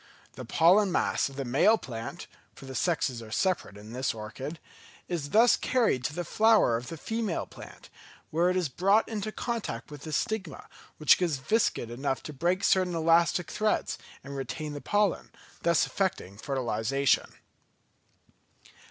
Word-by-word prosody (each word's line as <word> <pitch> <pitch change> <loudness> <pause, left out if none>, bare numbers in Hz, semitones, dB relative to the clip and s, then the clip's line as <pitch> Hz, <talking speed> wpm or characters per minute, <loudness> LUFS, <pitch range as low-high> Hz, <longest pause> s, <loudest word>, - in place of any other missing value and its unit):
The 130 +1 -8
pollen 180 - +4
mass - - +1
of 135 - -12
the 135 0 -4
male 145 - +4
plant 115 - -7 0.3
(for - - -12
the 135 - -8
sexes 130 -6 0
are 110 - -10
separate 175 - -1
in 105 +2 -11
this 130 -1 -1
orchid) 125 +9 -6 0.5
is 160 -5 -3
thus 230 +6 +6
carried 230 - +1
to 145 - -1
the 175 - -2
flower 215 - +4
of 120 +2 -4
the 165 - -6
female 220 +1 -2
plant, - - -13 0.4
where 170 +3 +2
it 185 - +1
is 180 -3 +1
brought 195 - +2
into 215 -1 -4
contact 235 -8 -4
with 145 -2 -9
the 155 - -7
stigma, 185 +2 -3 0.3
which 155 +3 +5
is 165 -5 +1
viscid 135 - 0
enough 135 +2 -2
to 150 - -7
break 175 +7 0
certain 185 -2 +3
elastic 165 +1 +2
threads, 215 0 0 0.2
and 140 0 -8
retain 140 +3 -5
the 145 - -6
pollen, 205 -2 0 0.3
thus 170 -1 +3
effecting 185 - -2
fertilisation. 135 +1 0
160 Hz, 160 wpm, -28 LUFS, 130-190 Hz, 0.5 s, thus